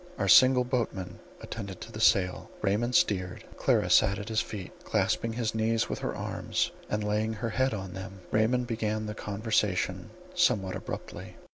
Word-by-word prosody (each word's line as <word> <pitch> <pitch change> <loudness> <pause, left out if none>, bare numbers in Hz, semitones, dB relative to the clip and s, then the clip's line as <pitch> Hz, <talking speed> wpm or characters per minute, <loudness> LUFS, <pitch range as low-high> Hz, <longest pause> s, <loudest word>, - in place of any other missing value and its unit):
Our - - -1
single 130 -1 +7
boatman 120 -7 -3 0.2
attended 100 -5 -7
to - - -8
the - - -6
sail; 90 -2 +3
Raymond 115 +5 +1
steered; 90 -3 +1
Clara - - +2
sat 100 - +5
at 105 +1 -6
his 110 0 +1
feet, 100 -4 -7
clasping 115 -1 0
his 115 -1 -1
knees 110 0 +1
with - - -3
her - - -3
arms, - - -2 0.2
and 105 0 -1
laying 105 +1 0
her 110 +1 -3
head 130 0 +1
on 95 -3 -6
them. 95 0 -8
Raymond 120 +3 +2
began 110 -2 -2
the 105 - -4
conversation 100 -4 -1 0.2
somewhat 120 - +2
abruptly. - - -7
110 Hz, 165 wpm, -29 LUFS, 95-115 Hz, 0.2 s, single